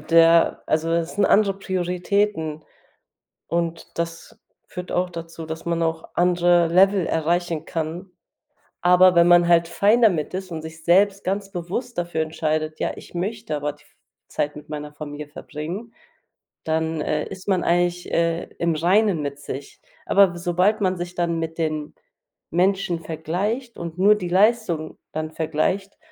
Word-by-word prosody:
der 165 Hz, +1 st, +4 dB
also, 160 Hz, +1 st, 0 dB
es 170 Hz, 0 st, -1 dB
sind 205 Hz, 0 st, +2 dB
andere 200 Hz, -2 st, +3 dB
Prioritäten 180 Hz, -3 st, -1 dB, 0.8 s
und 170 Hz, 0 st, -2 dB
das 165 Hz, 0 st, -5 dB, 0.3 s
führt 180 Hz, 0 st, -7 dB
auch 180 Hz, 0 st, 0 dB
dazu, 165 Hz, -1 st, -8 dB
dass 160 Hz, +1 st, -6 dB
man 170 Hz, 0 st, -1 dB
auch 160 Hz, 0 st, -2 dB
andere 175 Hz, -1 st, +3 dB
Level 190 Hz, +1 st, +4 dB
erreichen 165 Hz, 0 st, 0 dB
kann, 165 Hz, +4 st, -4 dB, 0.7 s
aber 180 Hz, +1 st, +6 dB
wenn 170 Hz, 0 st, +6 dB
man 175 Hz, 0 st, +6 dB
halt 170 Hz, -1 st, +5 dB
fine 210 Hz, +7 st, +3 dB
damit 180 Hz, -8 st, +2 dB
ist 185 Hz, -1 st, -5 dB
und 160 Hz, -1 st, -5 dB
sich 160 Hz, 0 st, -10 dB
selbst 195 Hz, +3 st, +3 dB
ganz 195 Hz, +1 st, -2 dB
bewusst 195 Hz, +8 st, -4 dB
dafür 170 Hz, -2 st, -2 dB
entscheidet: 155 Hz, 0 st, -2 dB
„Ja, -, -, 0 dB
ich -, -, -13 dB
möchte 200 Hz, -1 st, -3 dB
aber 145 Hz, 0 st, -2 dB
die 145 Hz, 0 st, -22 dB
f -, -, -28 dB, 0.3 s
Zeit 145 Hz, 0 st, -2 dB
mit 150 Hz, -, -11 dB
meiner 150 Hz, 0 st, -6 dB
Familie 150 Hz, 0 st, -7 dB
verbringen“, 170 Hz, +10 st, -7 dB, 0.7 s
dann, 160 Hz, 0 st, -1 dB
äh, 150 Hz, 0 st, -1 dB
ist 190 Hz, -1 st, -10 dB
man 190 Hz, -3 st, +1 dB
eigentlich, 175 Hz, +1 st, 0 dB
äh, 165 Hz, 0 st, +1 dB
im 170 Hz, -1 st, +1 dB
Reinen 180 Hz, +2 st, +2 dB
mit 140 Hz, 0 st, -4 dB
sich. 140 Hz, 0 st, -8 dB, 0.3 s
Aber 195 Hz, -3 st, +5 dB
s 175 Hz, -, -8 dB
sobald 185 Hz, +5 st, +2 dB
man 185 Hz, -2 st, +1 dB
sich 175 Hz, 0 st, -6 dB
dann 170 Hz, -2 st, -1 dB
mit 165 Hz, 0 st, -4 dB
den 155 Hz, -2 st, -2 dB, 0.6 s
Menschen 180 Hz, -1 st, +1 dB
vergleicht 185 Hz, -, -3 dB
und 170 Hz, 0 st, -6 dB
nur 205 Hz, +3 st, +6 dB
die 180 Hz, -4 st, -4 dB
Leistung 190 Hz, -5 st, +1 dB
dann 155 Hz, 0 st, -3 dB
vergleicht, 175 Hz, -, -1 dB
170 Hz, 160 wpm, -23 LUFS, 160-185 Hz, 0.8 s, aber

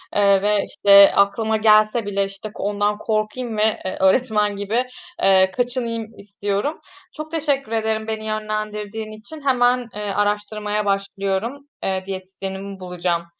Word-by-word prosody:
eee, 200 Hz, -1 st, +4 dB
ve, 205 Hz, 0 st, +2 dB
işte, 200 Hz, -7 st, +7 dB
aklıma 215 Hz, +2 st, +2 dB
gelse 215 Hz, +1 st, +4 dB
bile, 200 Hz, -1 st, 0 dB
işte, 195 Hz, +2 st, -9 dB
ondan 205 Hz, +1 st, -1 dB
korkayım 215 Hz, +2 st, -2 dB
ve, 215 Hz, +1 st, +2 dB
eee, 185 Hz, -, -3 dB
öğretmen 210 Hz, +1 st, +2 dB
gibi, 210 Hz, +5 st, -1 dB, 0.4 s
eee, 190 Hz, -1 st, +5 dB
kaçınayım 240 Hz, -1 st, -1 dB
istiyorum. 200 Hz, +7 st, -3 dB, 0.3 s
Çok 310 Hz, 0 st, -8 dB
teşekkür 285 Hz, -6 st, -1 dB
ederim 220 Hz, -1 st, -1 dB
beni 220 Hz, -1 st, -4 dB
yönlendirdiğin 215 Hz, 0 st, -4 dB
için. 220 Hz, +9 st, -11 dB
Hemen, 250 Hz, -1 st, +3 dB
eee, 210 Hz, -, -4 dB
araştırmaya 210 Hz, +1 st, -1 dB
başlıyorum. 200 Hz, +6 st, -2 dB, 0.2 s
Eee, 190 Hz, -1 st, -1 dB
diyetisyenimi 190 Hz, +1 st, -6 dB
bulacağım. 180 Hz, -2 st, -2 dB
210 Hz, 130 wpm, -21 LUFS, 200-225 Hz, 0.4 s, işte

